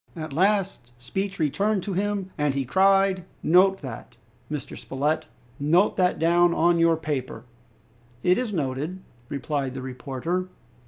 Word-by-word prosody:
At 155 Hz, -3 st, -6 dB
last 190 Hz, -, 0 dB
speech 195 Hz, +10 st, -3 dB
returned 195 Hz, +6 st, 0 dB
to 200 Hz, -, -3 dB
him, 200 Hz, 0 st, -2 dB
and 150 Hz, -2 st, 0 dB
he 135 Hz, -1 st, -1 dB
cried, 195 Hz, +4 st, +3 dB, 0.2 s
"Note 190 Hz, +2 st, +4 dB
that, 125 Hz, -3 st, -8 dB, 0.4 s
Mr. 150 Hz, -2 st, -5 dB
Spilett, 150 Hz, +4 st, -2 dB, 0.3 s
note 170 Hz, +8 st, +3 dB
that 180 Hz, -1 st, +2 dB
down 170 Hz, +1 st, +3 dB
on 170 Hz, +1 st, +3 dB
your 165 Hz, -1 st, +4 dB
paper!" 135 Hz, -7 st, -4 dB, 0.8 s
"It 180 Hz, +4 st, +4 dB
is 250 Hz, -4 st, -2 dB
noted," 155 Hz, +3 st, -3 dB, 0.3 s
replied 140 Hz, -2 st, -3 dB
the 130 Hz, -, -4 dB
reporter. 135 Hz, +7 st, -3 dB
165 Hz, 140 wpm, -25 LUFS, 140-190 Hz, 0.8 s, Note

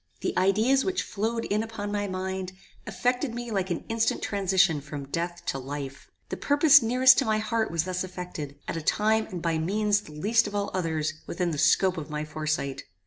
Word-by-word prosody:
The -, -, -2 dB
ideas 220 Hz, +8 st, +3 dB
which 380 Hz, -1 st, -1 dB
flowed 225 Hz, +3 st, -2 dB
in 210 Hz, +1 st, 0 dB
upon 220 Hz, -2 st, -5 dB
my 205 Hz, 0 st, -1 dB
mind, 185 Hz, 0 st, -4 dB, 0.3 s
affected 250 Hz, 0 st, -1 dB
me 240 Hz, -1 st, -5 dB
like 190 Hz, -2 st, -1 dB
an 175 Hz, -, -3 dB
instant 225 Hz, -1 st, 0 dB
transition 190 Hz, -5 st, +2 dB
from 140 Hz, 0 st, -7 dB
death 175 Hz, +3 st, -3 dB
to 135 Hz, -, -2 dB
life. 135 Hz, 0 st, -7 dB, 0.2 s
The -, -, -4 dB
purpose 290 Hz, 0 st, +6 dB
dearest 255 Hz, +2 st, +5 dB
to -, -, +1 dB
my 215 Hz, -1 st, +2 dB
heart 220 Hz, +1 st, -1 dB
was 165 Hz, -1 st, 0 dB
thus 185 Hz, +1 st, -2 dB
effected, 180 Hz, -6 st, -7 dB
at -, -, -3 dB
a 165 Hz, -, -3 dB
time 220 Hz, +6 st, +2 dB
and 175 Hz, -3 st, -7 dB
by 165 Hz, -2 st, 0 dB
means 205 Hz, +4 st, +1 dB
the 150 Hz, -, -13 dB
least 215 Hz, +9 st, +2 dB
of 205 Hz, -, -6 dB
all 200 Hz, 0 st, -1 dB
others 160 Hz, -4 st, -1 dB
within 175 Hz, 0 st, -1 dB
the 150 Hz, -, -3 dB
scope 180 Hz, +4 st, +3 dB
of 155 Hz, -1 st, -6 dB
my 150 Hz, 0 st, -3 dB
foresight. 155 Hz, -3 st, -3 dB
190 Hz, 200 wpm, -27 LUFS, 160-220 Hz, 0.3 s, purpose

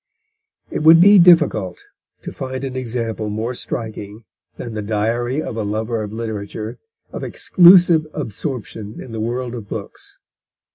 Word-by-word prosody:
It -, -, -2 dB
would 160 Hz, +2 st, +7 dB
be 200 Hz, +3 st, +7 dB
difficult 150 Hz, -, +3 dB, 0.4 s
to -, -, -6 dB
find 130 Hz, 0 st, -6 dB
an 130 Hz, -1 st, -5 dB
example 115 Hz, -3 st, -3 dB
more 110 Hz, +4 st, -3 dB
striking 110 Hz, -2 st, -6 dB, 0.3 s
than 120 Hz, -2 st, -7 dB
the 105 Hz, -, -4 dB
Diary 115 Hz, +7 st, -1 dB
of 115 Hz, -, -6 dB
a 110 Hz, -, -2 dB
Lover 110 Hz, +2 st, -2 dB
of 105 Hz, -1 st, -6 dB
Literature 110 Hz, -1 st, -6 dB, 0.3 s
of -, -, -7 dB
exclusive 175 Hz, -3 st, +5 dB
absorption 115 Hz, -5 st, -6 dB
in 125 Hz, -, -9 dB
the 110 Hz, -, -5 dB
world 120 Hz, +2 st, -3 dB
of 115 Hz, -4 st, -8 dB
books. -, -, -8 dB
115 Hz, 145 wpm, -19 LUFS, 110-135 Hz, 0.4 s, would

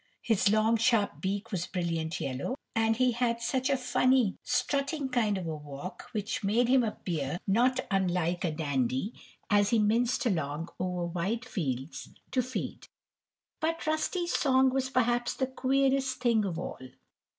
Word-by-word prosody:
His 210 Hz, -3 st, +3 dB
long, 215 Hz, +2 st, +3 dB
sharp 225 Hz, -2 st, +2 dB
beak 200 Hz, +4 st, -2 dB
was 180 Hz, -3 st, -2 dB
brilliant 165 Hz, -3 st, -2 dB
yellow, 135 Hz, -, -3 dB, 0.2 s
and 225 Hz, 0 st, +2 dB
he 255 Hz, +1 st, +3 dB
had 235 Hz, 0 st, 0 dB
such 260 Hz, +3 st, 0 dB
a 275 Hz, -, +3 dB
funny, 255 Hz, -3 st, +2 dB
strutting 275 Hz, +3 st, -1 dB
kind 220 Hz, -6 st, +1 dB
of 185 Hz, -, -4 dB
a 160 Hz, -1 st, -3 dB
walk 150 Hz, +4 st, -8 dB
which 210 Hz, 0 st, -3 dB
made 225 Hz, +5 st, +2 dB
him 260 Hz, -1 st, +5 dB
appear 170 Hz, -8 st, -3 dB
not 250 Hz, +6 st, +3 dB
unlike 180 Hz, -2 st, +1 dB
a 175 Hz, -, +1 dB
dandy 145 Hz, -, -1 dB, 0.4 s
as 205 Hz, -1 st, +4 dB
he 230 Hz, -, +3 dB
minced 230 Hz, +4 st, +2 dB
along 160 Hz, -6 st, -1 dB
over 180 Hz, -1 st, -1 dB
wide 190 Hz, +8 st, -2 dB
fields 140 Hz, -, -4 dB, 0.2 s
to 255 Hz, -, +2 dB
feed. 255 Hz, +1 st, -5 dB, 0.7 s
But 330 Hz, +1 st, -1 dB
Rusty's 325 Hz, +3 st, 0 dB
song 260 Hz, -2 st, +3 dB
was 265 Hz, -1 st, 0 dB
perhaps 240 Hz, -1 st, +1 dB
the 260 Hz, -, 0 dB
queerest 265 Hz, 0 st, +1 dB
thing 230 Hz, -4 st, +2 dB
of 175 Hz, -4 st, -3 dB
all. -, -, -5 dB
225 Hz, 155 wpm, -29 LUFS, 180-255 Hz, 0.7 s, him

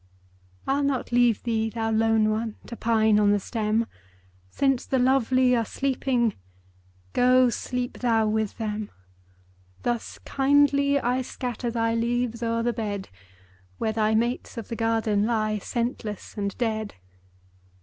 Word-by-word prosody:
I'll 275 Hz, +1 st, +1 dB
not 275 Hz, -4 st, -1 dB
leave 240 Hz, -3 st, +3 dB
thee, 225 Hz, -2 st, 0 dB
thou 225 Hz, 0 st, -2 dB
lone 220 Hz, -1 st, +3 dB
one! 220 Hz, 0 st, -2 dB
To 235 Hz, -, -7 dB
pine 220 Hz, -2 st, +3 dB
on 205 Hz, -1 st, +4 dB
the 205 Hz, 0 st, +3 dB
stem; 220 Hz, +2 st, -1 dB, 0.6 s
Since 270 Hz, -, 0 dB
the 265 Hz, -, +1 dB
lovely 255 Hz, 0 st, +3 dB
are 230 Hz, -, +1 dB
sleeping, 250 Hz, -2 st, 0 dB, 0.8 s
Go 250 Hz, 0 st, +4 dB
sleep 250 Hz, +1 st, -4 dB
thou 225 Hz, -3 st, +2 dB
with 215 Hz, -1 st, -1 dB
them. 215 Hz, -2 st, -3 dB, 0.9 s
Thus 240 Hz, -2 st, -2 dB
kindly 280 Hz, 0 st, +3 dB
I 250 Hz, 0 st, 0 dB
scatter 245 Hz, -1 st, -4 dB
Thy 230 Hz, -1 st, 0 dB
leaves 235 Hz, 0 st, -1 dB
o'er 230 Hz, 0 st, 0 dB
the 240 Hz, 0 st, +1 dB
bed, 205 Hz, -3 st, -4 dB, 0.7 s
Where 220 Hz, -, -1 dB
thy 220 Hz, 0 st, +2 dB
mates 235 Hz, +2 st, -1 dB
of 230 Hz, -, -6 dB
the 230 Hz, -, -3 dB
garden 225 Hz, -2 st, +1 dB
Lie 215 Hz, -2 st, 0 dB
scentless 230 Hz, -2 st, -4 dB
and 200 Hz, -1 st, -3 dB
dead. 220 Hz, -3 st, -2 dB
230 Hz, 140 wpm, -25 LUFS, 220-250 Hz, 0.9 s, on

